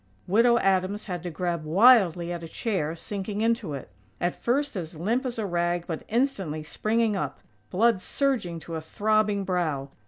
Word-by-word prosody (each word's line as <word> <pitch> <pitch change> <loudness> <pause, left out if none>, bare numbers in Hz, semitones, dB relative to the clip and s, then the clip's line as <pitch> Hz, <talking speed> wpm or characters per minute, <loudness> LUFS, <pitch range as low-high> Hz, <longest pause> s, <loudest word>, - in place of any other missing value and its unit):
_" - - -40 0.2
Widow 235 +5 +4
Adams 195 0 +1
had 180 -4 -4
to 175 - -4
grab 170 0 -2
wildly 175 -1 +5
at 170 - -5
a 165 - -7
chair, 165 -5 -2
sinking 200 +4 -4
into 225 -9 0
it; 135 - -9 0.3
at 175 0 0
first 280 +2 -1
as 170 -3 -5
limp 230 - 0
as 240 - -5
a 220 - -1
rag, 175 -1 0
but 165 -2 -4
instantly 205 - -1
springing 220 +6 0
up, 150 -7 -3 0.3
blood 220 0 +3
surging 225 -9 -1
to 165 - -8
a 160 - -3
throbbing 210 +3 +1
brow. 160 -7 -1
190 Hz, 180 wpm, -26 LUFS, 170-225 Hz, 0.3 s, wildly